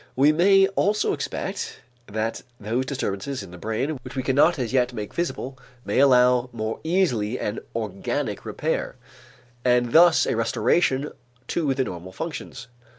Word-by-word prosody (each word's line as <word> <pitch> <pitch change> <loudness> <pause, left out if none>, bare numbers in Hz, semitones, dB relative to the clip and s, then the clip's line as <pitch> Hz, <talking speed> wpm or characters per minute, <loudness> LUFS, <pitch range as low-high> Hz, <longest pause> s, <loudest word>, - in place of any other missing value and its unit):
We 140 +3 +5
may 195 +4 +5
also 205 +2 +1
expect - - -4 0.3
that 110 +2 -3 0.2
those 115 +5 -2
disturbances 130 0 -3
in - - -11
the 90 - -10
brain 130 - -2
which - - -10
we 130 - -2
cannot 145 +6 +3
as 125 -3 -3
yet 125 -1 +2
make 105 -3 -6
visible, 135 -6 -3 0.3
may - - 0
allow 125 -2 +5
more 110 -1 -4
easily 130 - +1
an 105 +2 -3 0.2
organic 105 -4 -3
repair - - -2 0.7
and 125 -1 +2
thus 170 0 +6
a - - 0
restoration 130 +5 +1 0.4
to 145 -6 0
the 130 - +1
normal 90 -4 -7
functions. 135 - -6
130 Hz, 150 wpm, -24 LUFS, 110-150 Hz, 0.7 s, thus